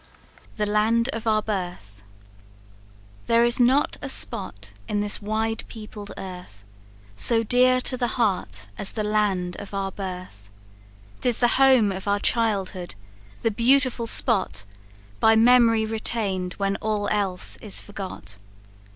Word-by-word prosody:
The 210 - -1
Land 220 +3 +2
Of 230 -3 -4
Our 215 -1 +2
Birth. 175 - -5 1.3
"There 230 0 +4
is 240 +1 +2
not 255 +4 +3
a 280 - -5
spot 105 - -2
in 205 - -1
this 205 +1 -2
wide 220 +2 -2
peopled 210 -2 -9
earth, 180 - -9 0.5
So 230 - +3
dear 255 +2 +4
to 255 - 0
the 245 -1 0
heart 190 - -1
as 195 - -2
the 215 - -2
land 205 -4 0
of 200 0 -8
our 195 -1 -2
birth; 180 - -8 0.7
'Tis 245 -2 +2
the 240 - +3
home 255 -6 +5
of 190 +1 -6
our 200 0 +2
childhood! 195 - -1 0.5
the 225 - +2
beautiful 245 +1 +2
spot 205 - +1 0.5
By 220 0 +5
mem'ry 230 -1 +5
retain'd 210 -4 -2
when 195 0 -1
all 215 -1 -2
else 195 -3 0
is 210 -3 -3
forgot. 190 - -8
210 Hz, 135 wpm, -24 LUFS, 190-230 Hz, 1.3 s, home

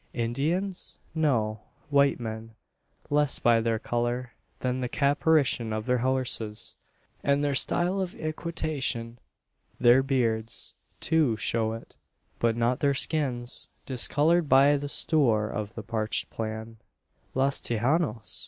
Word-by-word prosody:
Indians? 155 +12 -2 0.2
No. 120 -9 0 0.3
White 140 -1 +3
men 110 -1 -7 0.6
less 145 -1 +3
by 115 -1 +3
their 115 0 0
colour, 120 +2 -2 0.3
than 125 0 -1
the 125 - -2
caparison 140 -4 +2
of 110 0 -3
their 125 -1 +1
horses, 125 -4 -1 0.5
and 140 +1 +2
their 145 -1 +1
style 180 +7 +2
of 185 -1 -4
equitation. 155 -7 -3 0.6
Their 120 +2 +6
beards, 115 -5 -1 0.3
too, 150 -9 +2
show 110 0 0
it; 115 - -11 0.4
but 115 -1 +1
not 120 +2 +1
their 140 -2 +2
skins, 130 -4 -1 0.2
discoloured 150 +5 +4
by 140 +2 +6
the 145 0 -3
"stoor" 120 -10 +3
of 105 0 -5
the 115 - -6
parched 110 -1 -2
plain. 110 0 -5 0.6
"Los 135 +1 +1
Tejanos!" 120 +1 0
125 Hz, 125 wpm, -27 LUFS, 115-145 Hz, 0.6 s, Their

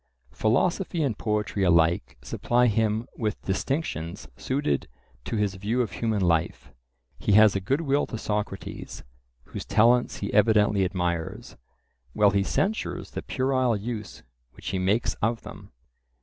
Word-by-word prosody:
Philosophy 155 - +1
and 130 -7 0
poetry 105 -2 -1
alike 80 -7 +2
supply 125 +1 +1
him 110 0 +1
with 110 -3 -1
distinctions 95 - -3
suited 130 - -1 0.4
to - - -3
his 105 -2 0
view 105 +6 0
of 110 - -5
human 110 -1 -1
life. 85 -3 0 0.5
He 105 - +1
has 110 0 +7
a - - +1
good 135 - 0
will 145 -2 +1
to 115 - -5
Socrates, 105 -2 -4 0.4
whose - - -7
talents 120 +3 +3
he 100 - -4
evidently 105 -2 +4
admires, 90 -2 -3 0.6
while 105 -1 +4
he 100 0 +2
censures 200 - -2
the - - -4
puerile 130 -3 +1
use 110 +1 -6 0.3
which - - -7
he 95 - -1
makes 110 +5 +1
of 115 +2 0
them. - - -11
105 Hz, 140 wpm, -26 LUFS, 95-120 Hz, 0.6 s, has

